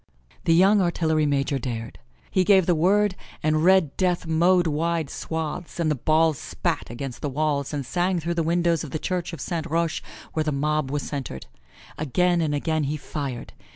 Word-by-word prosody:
The 165 Hz, -, +4 dB
young 195 Hz, +4 st, +5 dB
artillery 160 Hz, -3 st, +1 dB
major 140 Hz, 0 st, 0 dB
dare. 115 Hz, -2 st, -4 dB, 0.4 s
He 185 Hz, -, +3 dB
gave 190 Hz, -2 st, +5 dB
the 175 Hz, -, +3 dB
word 195 Hz, +5 st, +3 dB, 0.3 s
and 155 Hz, 0 st, +2 dB
red 185 Hz, -5 st, +4 dB
death 180 Hz, -2 st, +1 dB
mowed 175 Hz, +3 st, +3 dB
wide 160 Hz, 0 st, -1 dB
swaths, 160 Hz, +2 st, -4 dB
and 160 Hz, -2 st, +2 dB
the -, -, +1 dB
balls 155 Hz, +2 st, +2 dB
spat -, -, -3 dB
against 120 Hz, +1 st, -6 dB
the 145 Hz, -, -2 dB
walls 145 Hz, 0 st, -1 dB
and 145 Hz, -3 st, -3 dB
sang 180 Hz, +6 st, 0 dB
through 170 Hz, +1 st, -2 dB
the 170 Hz, -, 0 dB
windows 170 Hz, 0 st, +1 dB
of 155 Hz, -, -6 dB
the 155 Hz, -, -3 dB
Church 180 Hz, +2 st, -2 dB
of 165 Hz, -, -7 dB
Saint 165 Hz, +2 st, -3 dB
Roche 165 Hz, 0 st, 0 dB, 0.3 s
where 155 Hz, -, 0 dB
the 155 Hz, -, -1 dB
mob 150 Hz, 0 st, 0 dB
was 145 Hz, 0 st, -2 dB
centered. 130 Hz, -, -5 dB, 0.5 s
Again 175 Hz, +4 st, +2 dB
and 150 Hz, -2 st, 0 dB
again 155 Hz, +1 st, 0 dB
he 150 Hz, +2 st, -2 dB
fired. 140 Hz, -4 st, -5 dB
160 Hz, 190 wpm, -24 LUFS, 145-175 Hz, 0.5 s, young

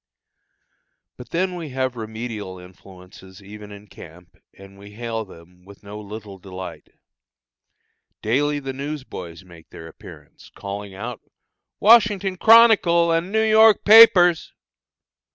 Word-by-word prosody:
But 125 Hz, -1 st, -14 dB
then 185 Hz, +2 st, -2 dB
we 170 Hz, -4 st, -8 dB
have 130 Hz, -1 st, -4 dB
remedial 110 Hz, -4 st, -8 dB
influences 90 Hz, +1 st, -16 dB
even 105 Hz, +1 st, -13 dB
in 100 Hz, 0 st, -13 dB
camp, 90 Hz, -3 st, -16 dB, 0.2 s
and 100 Hz, 0 st, -16 dB
we 100 Hz, +1 st, -15 dB
hail 115 Hz, 0 st, -6 dB
them 90 Hz, -1 st, -19 dB
with 100 Hz, +2 st, -18 dB
no 105 Hz, +1 st, -10 dB
little 105 Hz, -1 st, -11 dB
delight. 95 Hz, 0 st, -11 dB, 1.3 s
Daily 145 Hz, +7 st, -1 dB
the 135 Hz, -2 st, -7 dB
news 140 Hz, +1 st, -7 dB
boys 85 Hz, -6 st, -11 dB
make 85 Hz, -2 st, -18 dB
their 80 Hz, -, -12 dB
appearance, -, -, -16 dB
calling 100 Hz, 0 st, -9 dB
out: 115 Hz, +4 st, -8 dB, 0.6 s
"Washington 205 Hz, -4 st, +3 dB
Chronicle 205 Hz, -7 st, +4 dB
and 165 Hz, +3 st, -2 dB
New 220 Hz, +1 st, 0 dB
York 220 Hz, 0 st, +3 dB
papers!" 195 Hz, -6 st, +5 dB
110 Hz, 125 wpm, -20 LUFS, -, 1.3 s, papers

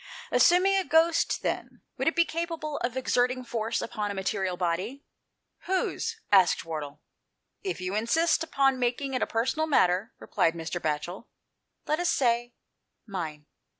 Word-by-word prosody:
"Assuming 365 Hz, +3 st, +5 dB
a 385 Hz, -, +2 dB
ghost, 325 Hz, 0 st, +2 dB
then, -, -, -3 dB
would -, -, -2 dB
it 325 Hz, -, +2 dB
be 340 Hz, -, +4 dB
capable 330 Hz, -3 st, -3 dB
of 240 Hz, +1 st, -2 dB
exerting 255 Hz, 0 st, +1 dB
force 230 Hz, -1 st, -2 dB
upon 210 Hz, -2 st, -3 dB
a 200 Hz, -, -4 dB
material 190 Hz, -1 st, -1 dB
body? 185 Hz, -, -2 dB, 0.2 s
" -, -, -54 dB
" -, -, -53 dB
Whose? 445 Hz, +4 st, -1 dB
" -, -, -40 dB
asked 190 Hz, -4 st, +5 dB
Wardle. 150 Hz, -3 st, -6 dB, 0.3 s
" -, -, -51 dB
If -, -, -6 dB
you 185 Hz, +1 st, -3 dB
[insist 315 Hz, +11 st, +2 dB
upon 270 Hz, -4 st, +2 dB
making 250 Hz, +3 st, -1 dB
it 255 Hz, -, -1 dB
a -, -, +1 dB
personal 260 Hz, +8 st, 0 dB
matter," 190 Hz, -, +2 dB
replied 165 Hz, -, 0 dB
Mr. 170 Hz, +1 st, -4 dB
Batchel, 160 Hz, -, -3 dB, 0.3 s
" -, -, -53 dB
let 305 Hz, +2 st, +1 dB
us 350 Hz, -, +1 dB
say 240 Hz, -1 st, +1 dB, 0.5 s
mine." 160 Hz, -7 st, -5 dB
240 Hz, 170 wpm, -28 LUFS, -, 0.5 s, Assuming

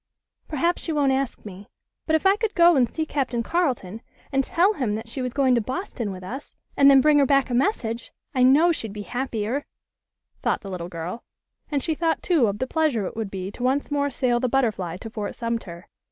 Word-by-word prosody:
"Perhaps 335 Hz, +4 st, 0 dB
she 330 Hz, -, -3 dB
won't 290 Hz, -3 st, +2 dB
ask 265 Hz, -3 st, -2 dB
me. 200 Hz, +2 st, -10 dB, 0.4 s
But 315 Hz, -, +3 dB
if 315 Hz, -, 0 dB
I 385 Hz, +1 st, +6 dB
could 435 Hz, 0 st, -2 dB
go 345 Hz, -1 st, +6 dB
and 250 Hz, -4 st, +3 dB
see 315 Hz, +5 st, -2 dB
Captain 255 Hz, -6 st, -1 dB
Carleton, 245 Hz, -, -1 dB, 0.3 s
and 270 Hz, -1 st, +2 dB
tell 365 Hz, +9 st, +2 dB
him 245 Hz, -, -1 dB
that 225 Hz, +1 st, -6 dB
she 260 Hz, +4 st, -5 dB
was 250 Hz, -1 st, -2 dB
going 265 Hz, -1 st, +2 dB
to 240 Hz, -, +3 dB
Boston 255 Hz, -, -4 dB
with 185 Hz, -1 st, -8 dB
us, 260 Hz, +10 st, -8 dB, 0.2 s
and 280 Hz, 0 st, +7 dB
then 270 Hz, -1 st, +7 dB
bring 300 Hz, +1 st, +5 dB
her 280 Hz, -, +5 dB
back 275 Hz, -1 st, +2 dB
a -, -, -1 dB
message, 240 Hz, -, -1 dB, 0.2 s
I 255 Hz, -, +1 dB
know 285 Hz, +7 st, +6 dB
she'd 225 Hz, -10 st, -4 dB
be 210 Hz, 0 st, -6 dB
happier," 245 Hz, +2 st, -2 dB, 0.8 s
thought -, -, 0 dB
the 195 Hz, -, -8 dB
little 175 Hz, -1 st, -5 dB
girl. 175 Hz, +7 st, -6 dB, 0.5 s
And 285 Hz, -3 st, -1 dB
she 325 Hz, -, 0 dB
thought, 325 Hz, +1 st, -1 dB
too, 315 Hz, -10 st, +3 dB
of 200 Hz, 0 st, -2 dB
the 260 Hz, -, -1 dB
pleasure 275 Hz, -7 st, 0 dB
it -, -, -6 dB
would 220 Hz, -3 st, -3 dB
be 190 Hz, 0 st, -5 dB
to 245 Hz, -, -11 dB
once 265 Hz, +4 st, 0 dB
more 285 Hz, 0 st, +1 dB
sail 250 Hz, -2 st, 0 dB
the 255 Hz, 0 st, 0 dB
Butterfly 215 Hz, -10 st, 0 dB
to 225 Hz, -, -6 dB
Fort 210 Hz, -2 st, -4 dB
Sumter. 230 Hz, -7 st, -4 dB
255 Hz, 225 wpm, -24 LUFS, 220-290 Hz, 0.8 s, and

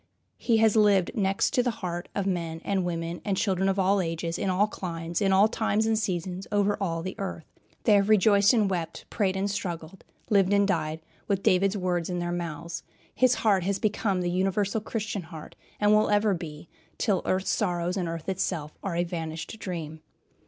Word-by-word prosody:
He 230 Hz, -2 st, +2 dB
has 220 Hz, -1 st, +4 dB
lived 205 Hz, -4 st, +4 dB
next 195 Hz, -2 st, +1 dB
to 250 Hz, -, +4 dB
the 245 Hz, -, 0 dB
heart 175 Hz, -5 st, -5 dB
of 200 Hz, -, -1 dB
men, 170 Hz, -4 st, -2 dB
and 195 Hz, -2 st, 0 dB
women, 170 Hz, -1 st, -3 dB
and 200 Hz, -3 st, -1 dB
children, 195 Hz, -2 st, +1 dB
of 195 Hz, -, 0 dB
all 195 Hz, +1 st, +3 dB
ages, 165 Hz, 0 st, -3 dB
in 195 Hz, -, 0 dB
all 185 Hz, +3 st, +3 dB
climes, 170 Hz, -4 st, -4 dB
in 195 Hz, -1 st, +3 dB
all 195 Hz, +2 st, +6 dB
times 220 Hz, -1 st, 0 dB
and 225 Hz, 0 st, +2 dB
seasons, 185 Hz, -2 st, -3 dB
all 205 Hz, -, +1 dB, 0.3 s
over 165 Hz, -3 st, -2 dB
the 185 Hz, -, -4 dB
earth. 185 Hz, -5 st, -5 dB, 0.4 s
They 215 Hz, -, +4 dB
have 200 Hz, 0 st, +4 dB
rejoiced 200 Hz, -1 st, +5 dB
and 220 Hz, -5 st, +3 dB
wept, 175 Hz, -4 st, -3 dB
prayed 190 Hz, -3 st, 0 dB
and 195 Hz, +1 st, 0 dB
struggled, 180 Hz, -3 st, -5 dB, 0.3 s
lived 200 Hz, -1 st, +4 dB
and 200 Hz, 0 st, +4 dB
died, 160 Hz, -4 st, -1 dB, 0.3 s
with 195 Hz, -1 st, 0 dB
David's 195 Hz, +2 st, +3 dB
words 180 Hz, -2 st, -1 dB
in 180 Hz, -, -2 dB
their 175 Hz, 0 st, -2 dB
mouths. 170 Hz, -1 st, -4 dB, 0.3 s
His 255 Hz, -1 st, +3 dB
heart 200 Hz, -4 st, +2 dB
has 200 Hz, 0 st, 0 dB
become 200 Hz, -2 st, 0 dB
the 175 Hz, 0 st, -1 dB
universal 195 Hz, +3 st, 0 dB
Christian 215 Hz, -2 st, -3 dB
heart, 160 Hz, -2 st, -10 dB, 0.2 s
and 210 Hz, 0 st, +4 dB
will 215 Hz, 0 st, +4 dB
ever 205 Hz, 0 st, +3 dB
be, 160 Hz, -3 st, -7 dB, 0.3 s
till 200 Hz, -6 st, +1 dB
earth's 185 Hz, +1 st, 0 dB
sorrows, 180 Hz, -3 st, 0 dB
and 185 Hz, -3 st, -1 dB
earth 165 Hz, -1 st, -6 dB
itself, 170 Hz, -5 st, -2 dB
are 195 Hz, -4 st, -3 dB
a 175 Hz, -, +2 dB
vanished 165 Hz, +4 st, -5 dB
dream. 160 Hz, -5 st, -5 dB
190 Hz, 195 wpm, -27 LUFS, 170-205 Hz, 0.4 s, all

